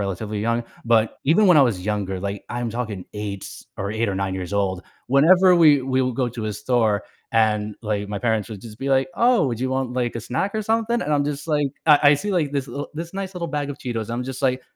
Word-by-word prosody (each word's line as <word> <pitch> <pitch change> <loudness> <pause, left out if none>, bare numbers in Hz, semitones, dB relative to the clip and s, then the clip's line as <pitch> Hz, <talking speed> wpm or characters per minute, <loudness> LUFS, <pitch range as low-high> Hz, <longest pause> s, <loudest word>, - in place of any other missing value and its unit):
relatively 100 +2 -3
young- 115 +2 0 0.2
but, 115 -1 +2
even 170 +9 +4
when 180 -4 +6
I 145 - +8
was 100 -8 0
younger, 100 -3 -2
like, 100 +1 -5
I'm 120 -1 -3
talkin' 110 -5 -4
8 105 -2 -5 0.3
8 110 +4 -1
or 100 - -1
9 95 -1 -2
years 90 -1 -5
old, 95 -2 0 0.2
whenever 180 +8 +5
we 150 -5 +6
we'll 130 -1 0
go 125 0 0
to 115 -2 -5
a 105 - -2
store 110 -1 +1 0.3
and, 105 -2 +1
like, 105 -2 -2
my 105 0 -3
parents 110 -4 0
would 105 -3 -8
just 110 +1 -11
be 135 - -3
like, 135 -1 +2
"Oh, 240 - +3
would 120 -4 -2
you 130 - 0
want, 130 -1 -1
like, 125 -1 -1
a - - -4
snack 130 - -2
or 215 - -1
something?" 225 +2 0
and 150 - -2
I'm 145 -1 +2
just 145 +1 -4
like, 150 -3 +1 0.2
I 150 -2 +7
I - - +6
see, 200 +8 -3
like, 160 -6 +1
this 140 -2 -2
li 145 +1 -5
this 165 +3 -6
nice 195 -1 -5
little 170 -1 -3
bag 145 -1 -2
of 145 - -7
Cheetos, 115 -3 -4
I'm 120 +2 -3
just 130 +1 -6
like, 130 -1 +1
125 Hz, 245 wpm, -22 LUFS, 105-145 Hz, 0.3 s, I